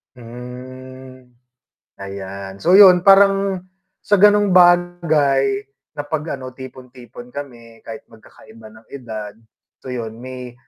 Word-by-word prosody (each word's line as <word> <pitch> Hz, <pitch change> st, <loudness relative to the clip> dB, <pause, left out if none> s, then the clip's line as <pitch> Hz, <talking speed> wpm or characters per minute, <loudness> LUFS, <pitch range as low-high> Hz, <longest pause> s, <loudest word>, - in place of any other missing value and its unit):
Hmm. 130 Hz, +2 st, -12 dB, 0.7 s
Ayan. 100 Hz, 0 st, -9 dB
So, 180 Hz, +3 st, +5 dB
'yun, 185 Hz, -3 st, +7 dB
parang 195 Hz, -1 st, +3 dB, 0.3 s
sa 205 Hz, -, -1 dB
gano'ng 205 Hz, -1 st, +4 dB
bagay 160 Hz, -7 st, +2 dB, 0.3 s
na 145 Hz, -, -5 dB
'pag 155 Hz, -1 st, -4 dB
ano, 130 Hz, -1 st, -10 dB
tipon-tipon 125 Hz, -1 st, -13 dB
kami 120 Hz, -5 st, -11 dB
kahit 115 Hz, -1 st, -10 dB
magkakaiba 110 Hz, 0 st, -17 dB
ng 110 Hz, +1 st, -19 dB
edad, 110 Hz, -6 st, -9 dB, 0.5 s
so 130 Hz, -, -9 dB
'yun 115 Hz, -3 st, -6 dB
may 125 Hz, -1 st, -9 dB
130 Hz, 110 wpm, -18 LUFS, 115-175 Hz, 0.7 s, yun